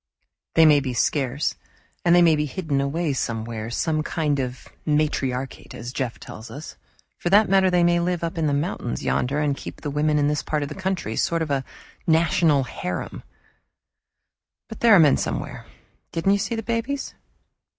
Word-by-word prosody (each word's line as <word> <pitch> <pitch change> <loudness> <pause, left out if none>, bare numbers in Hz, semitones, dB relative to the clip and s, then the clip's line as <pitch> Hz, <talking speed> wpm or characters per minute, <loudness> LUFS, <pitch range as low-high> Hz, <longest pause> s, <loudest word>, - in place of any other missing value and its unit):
"They 165 - +7
may 150 -2 +6
be 130 -3 -3
scarce, 135 +3 0 0.5
and 175 0 +5
they 175 - +6
may 165 -2 +5
be 150 0 -1
hidden 145 -2 -1
away 145 +2 -1
somewhere 115 -3 -3
some 155 +6 0
kind 155 -2 -1
of 125 -1 -4
a - - -11
matriarchate, 135 -4 -1
as 120 +2 -7
Jeff 130 -5 -3
tells 110 +2 -10
us; 150 +3 -9 0.4
for 175 - -1
that 205 +3 +6
matter, 190 0 +4
they 180 -1 +3
may 175 0 +3
live 175 0 -1
up 165 0 -2
in 160 -2 0
the - - +1
mountains 145 -5 -3
yonder 135 +4 0
and 145 -2 +1
keep - - -9
the 145 - -3
women 150 +1 +1
in 145 -1 +2
this 150 0 0
part 150 -1 -1
of 140 - -4
the - - -5
country 190 - -3
sort 165 -1 +1
of 150 - -4
a 135 -1 0 0.4
national 160 -3 +3
harem! 90 -7 -5 1.5
But 220 - -8
there 230 -3 +7
are - - +7
men 150 -4 +6
somewhere - - -4 0.4
didn't 165 +4 +1
you 200 - +2
see 230 - -2
the 225 - -4
babies?" 235 +5 -2
150 Hz, 190 wpm, -23 LUFS, 135-175 Hz, 1.5 s, They